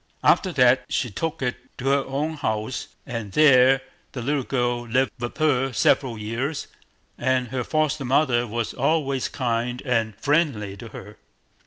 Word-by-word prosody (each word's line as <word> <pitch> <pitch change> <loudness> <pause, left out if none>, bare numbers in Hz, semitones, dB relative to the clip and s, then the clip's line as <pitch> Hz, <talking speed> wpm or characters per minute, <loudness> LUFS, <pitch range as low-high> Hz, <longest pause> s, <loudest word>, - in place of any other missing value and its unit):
After 185 - +4
that 125 -1 +4
she 125 - -1
took 165 - -3
it 125 -1 -1 0.2
to 130 +1 -1
her 140 0 +3
own 145 +4 -2
house, 110 -4 -3 0.2
and 115 -5 -5
there 135 -3 +6 0.3
the 125 - -5
little 145 +2 0
girl 120 -2 -1
lived 130 +3 +1
with 120 0 -5
her 135 -4 +2
several 120 -1 +2
years, 120 +8 -3 0.5
and 130 -2 +1
her 125 0 -2
foster 155 +1 0
mother 125 -2 +2
was 115 +1 -3
always 140 -1 0
kind 120 -1 -2
and 115 -5 0
friendly 125 -6 0
to 115 - -9
her. 105 -1 -11
125 Hz, 155 wpm, -24 LUFS, 120-140 Hz, 0.5 s, there